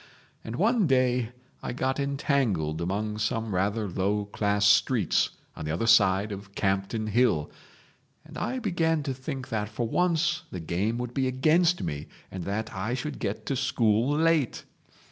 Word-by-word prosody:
And 115 - -5
one 215 - +3
day 125 -3 +2 0.3
I - - -4
got 130 +2 -1
entangled 130 - 0
among 105 +4 -2
some 110 0 -1
rather 100 +4 0
low 100 +3 0
class 105 0 0
streets 100 -1 +3 0.3
on - - -7
the - - -3
other 85 +8 -1
side 105 -2 +4
of 100 0 -8
Campden 100 +3 -1
Hill, 105 -9 +2 0.7
and - - -13
I 260 - -2
began 165 - 0
to 140 -2 -2
think 130 0 -6
that 105 -2 -2
for 120 +1 -2
once 175 +3 +1
the 90 - -6
game 95 +8 -1
would 125 0 -4
be 130 0 +1
against 160 +7 +3
me 75 0 -4 0.2
and 95 -2 -6
that 110 +3 -3
I 120 +3 -2
should 140 +3 -5
get 100 +2 -3
to 135 - -1
school 125 +1 +2
late. 160 -5 +2
115 Hz, 165 wpm, -27 LUFS, 100-140 Hz, 0.7 s, side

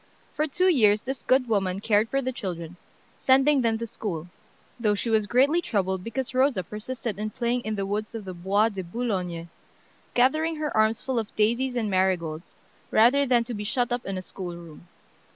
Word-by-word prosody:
For 305 +1 0
two 365 +6 +1
years 215 - +4
this 265 0 -5
good 255 -1 +2
woman 195 -4 0
cared 210 +1 +2
for 275 0 0
the 260 - -1
children, 175 -7 -6 0.4
sending 270 +1 +4
them 225 -2 +1
to 230 - -4
school, 180 -7 -5 0.5
though 210 -3 +2
she 230 +3 -2
was 215 -2 +2
greatly 275 +9 +3
troubled 190 - -1
because 250 +4 -4
Rosa 255 -7 +2
persisted 215 +3 -5
in 215 0 -2
playing 240 +2 -1
in 215 -2 -3
the 195 -1 -2
woods 210 +3 -3
of 220 -3 -6
the 185 - -6
Bois 195 +5 +2
de 195 -3 -5
Boulogne, 180 -4 -3 0.7
gathering 310 +6 +3
her 305 -1 -3
arms 220 +1 +3
full 260 -3 0
of 220 - -6
daisies 235 +4 +1
and 230 -3 0
marigolds, 185 -4 -1 0.3
rather 265 +6 +4
than 245 -2 +3
to 240 +1 -6
be 210 -1 -4
shut 245 +3 0
up 245 -1 -1
in 195 -1 -3
a 185 - -5
schoolroom. 170 -3 -9
220 Hz, 190 wpm, -26 LUFS, 190-255 Hz, 0.7 s, years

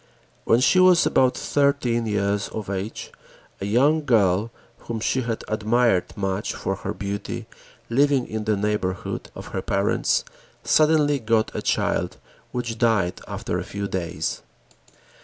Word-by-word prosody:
When 115 - +4
she 185 - +4
was 185 -1 +6
about 130 -1 +3
thirteen 140 -5 +1
years 100 -1 0
of 105 -3 -6
age, 100 +3 -5 0.5
a 100 - -3
young 145 +9 +3
girl 105 -5 +3 0.3
whom 115 -1 -5
she 130 +4 0
had 115 -2 -3
admired 110 -2 +2
much 95 0 -2
for - - -3
her - - -4
beauty, 100 +1 -5 0.4
living 135 +1 +2
in 110 -1 -4
the 110 -2 +1
neighborhood 100 -3 -2
of - - -8
her - - -3
parents, 100 +1 +1 0.4
suddenly 150 -2 +3
got 110 -1 +1
a - - -3
child - - 0 0.3
which 115 -2 -4
died 110 -7 +1
after - - -3
a - - -3
few 100 0 -4
days. 90 -4 -3
110 Hz, 140 wpm, -23 LUFS, 100-125 Hz, 0.5 s, was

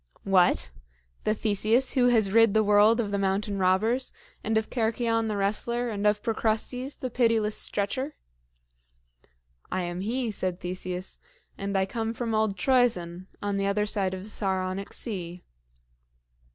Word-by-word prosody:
"What? 180 - +3 0.5
the 215 - +2
Theseus 220 +4 +2
who 250 -2 +4
has 220 -5 +3
rid 225 -2 +5
the 220 - +5
world 210 +3 +5
of 210 -3 -1
the 200 - 0
mountain 195 +1 -1
robbers, 215 +8 +1 0.3
and 220 +1 +1
of 220 - 0
Cercyon 225 -1 0
the 210 -1 -2
wrestler, 235 +4 0
and 205 0 0
of 210 0 +1
Procrustes, 230 +4 -1
the 255 - -5
pitiless 225 -3 +2
Stretcher?" 260 +9 -1 1.6
"I 185 0 -1
am 175 +1 -4
he," 235 +3 -1
said 185 -3 -2
Theseus; 180 +1 -5 0.4
"and 200 0 -2
I 190 - +2
come 225 +3 -3
from 230 -1 -3
old 215 -2 +1
Troezen, 185 -7 +1 0.2
on 205 -1 -1
the 195 0 0
other 210 +1 +1
side 195 -3 0
of 185 - -8
the 210 - -8
Saronic 190 0 -2
Sea." 180 -5 -4
210 Hz, 150 wpm, -27 LUFS, 190-230 Hz, 1.6 s, rid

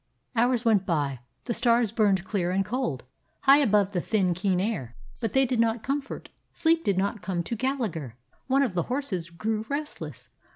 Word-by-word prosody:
Hours 240 +1 +2
went 215 -4 +4
by. 145 -8 -1 0.2
The 240 - -2
stars 235 -2 +3
burned 200 -5 +2
clear 185 -3 -1
and 195 +2 +1
cold, 230 - -2 0.4
high 275 +2 +7
above 210 -7 +3
the 180 -3 -1
thin, 190 -4 +1
keen 185 +1 0
air, 185 - -2 0.2
but 225 -4 -2
they 270 0 +4
did 250 -2 -1
not 230 0 +2
comfort; 275 +1 -3 0.2
sleep 330 0 +2
did 195 -2 +1
not 200 +2 0
come 180 -1 -2
to 235 - -3
Gallagher. 215 - -2 0.3
One 275 +1 +3
of 240 -8 -1
the 175 - +1
horses 230 - -2
grew 215 +5 -2
restless. 295 +2 -5
215 Hz, 180 wpm, -27 LUFS, 185-250 Hz, 0.4 s, high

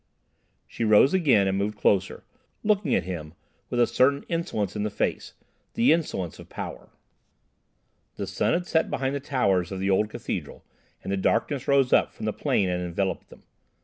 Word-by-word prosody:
She - - -5
rose 110 - +5
again 130 - +4
and 95 - 0
moved 105 +1 -2
closer, 95 -2 +1 0.4
looking 210 -2 +2
at - - +1
him 80 -4 -6 0.3
with 120 - -1
a 120 - +6
certain 140 +4 +2
insolence 110 - -2
in 105 - -2
the 105 - -1
face—the 230 - -1
insolence 120 - -3
of - - -12
power. - - -7 1.3
The 100 - -4
sun 100 +4 0
had 180 - 0
set 160 -2 +1
behind 135 0 -1
the 140 - -2
towers 100 - 0
of 95 - -4
the 95 +1 0
old 105 +2 +2
cathedral - - -6 0.4
and - - -4
the 100 - 0
darkness 120 +7 0
rose 140 -2 +3
up - - +4
from - - -6
the - - -1
plain 100 - 0
and 90 0 -1
enveloped 90 +2 -3
them. - - -16
105 Hz, 180 wpm, -26 LUFS, 95-140 Hz, 1.3 s, a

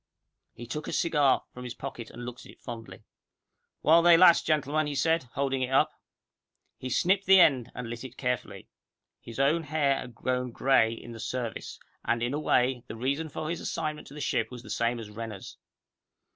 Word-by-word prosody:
He 120 - -8
took 150 +6 -5
a - - -4
cigar 145 -5 +2
from 125 - -9
his 125 -1 -6
pocket, 120 -4 -7
and 120 - -9
looked 125 0 -8
at - - -12
it - - -20
fondly. 115 -4 -9 0.8
"While 165 +2 +6
they 170 0 +7
last, 175 -1 +6
gentlemen," 155 0 +1
he 145 - -3
said, 160 0 +1
holding 135 -1 -1
it 130 - -1
up. 135 - +3 0.9
He 130 - -5
snipped 190 +9 +2
the 190 0 +8
end, 130 -8 +4
and 125 -1 -5
lit 120 +1 -6
it 130 -1 -10
carefully. 125 -2 -3 0.5
His 115 - -10
own 150 +5 +3
hair 145 -3 +1
had 125 -2 -9
grown 125 0 -1
grey 120 -2 +3
in 115 +1 -8
the 115 - -9
Service, 120 -1 -5 0.2
and, 120 +1 0
in 120 +3 -1
a 145 - -1
way, 125 -4 +1
the - - -7
reason 140 +7 -2
for 155 +2 -5
his 170 - -4
assignment 155 -1 -4
to 140 - -12
the 150 - -7
ship 115 -5 0
was 125 -1 -9
the 110 - -9
same 115 +2 0
as 110 -2 -8
Renner's. 110 -2 -8
130 Hz, 200 wpm, -28 LUFS, 120-150 Hz, 0.9 s, the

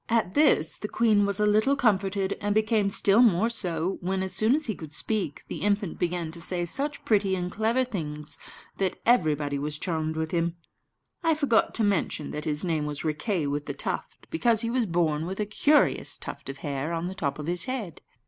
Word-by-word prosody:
At 225 -5 +1
this 270 - +3
the 210 - -4
queen 210 -3 +3
was 200 -1 -2
a 210 - +3
little 215 +7 +3
comforted, 200 -6 +1
and 205 0 0
became 215 -2 +2
still 200 +3 +4
more 225 -1 +4
so, 180 -4 -2
when, 190 +1 -1
as 190 -1 -3
soon 220 +7 +4
as 310 0 0
he 220 - -1
could 155 -5 -9
speak, 200 -8 -2
the - - -5
infant 200 -3 -1
began 175 -2 -1
to 170 +1 -10
say 175 +1 0
such 280 - -3
pretty 200 -3 +2
and 180 -1 -3
clever 225 +5 +1
things 150 -11 -5 0.4
that 190 -1 0
everybody 150 - +2
was 150 +1 -3
charmed 160 -2 -2
with 160 0 -2
him. 170 0 0 0.7
(I 330 -2 +2
forgot 280 -7 +2
to 225 - +1
mention 190 -7 0
that 150 - -5
his 150 +2 0
name 155 -4 0
was 145 +1 -5
Riquet 160 +2 -1
with 145 +1 -3
the - - -4
Tuft, - - -4
because 235 -9 +2
he 230 -1 -2
was 245 -3 +1
born 165 -2 0
with 190 +2 -5
a 210 - +1
curious 290 +8 +2
tuft - - -7
of 135 - -6
hair 145 +3 -2
on 165 +1 -2
the 185 - -4
top 155 -8 -2
of 150 - -6
his 175 +2 +1
head.) 245 - -5
190 Hz, 210 wpm, -27 LUFS, 160-220 Hz, 0.7 s, still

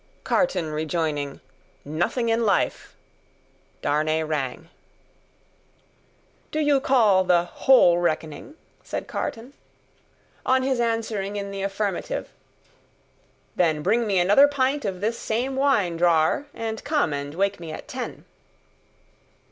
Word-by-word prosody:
Carton 185 - 0
rejoining, 155 -2 -2 0.4
"Nothing 175 - -1
in 230 +1 +2
life!" 200 -4 0 0.9
Darnay 155 +2 +1
rang. 155 0 -3 1.8
"Do 310 - -3
you 290 -2 +3
call 220 -8 +4
the 175 -2 +3
whole 175 -2 +4
reckoning?" 160 - -3 0.3
said - - -5
Carton. 240 +4 -5 0.9
On 260 0 +2
his 260 -2 0
answering 225 -4 -1
in 200 -1 -4
the 195 0 -5
affirmative, 200 - -3 1.2
"Then 160 -4 +1
bring 225 +5 +2
me 195 -2 +1
another 205 +11 +6
pint 280 -1 0
of 190 -2 -3
this 225 +3 -1
same 245 +4 -2
wine, 235 -11 +2
drawer, 170 - +2
and 225 -3 -5
come 290 - +1
and 145 +1 -5
wake 200 +1 0
me 165 -2 -7
at - - -8
ten." - - -6
200 Hz, 115 wpm, -24 LUFS, 160-240 Hz, 1.8 s, another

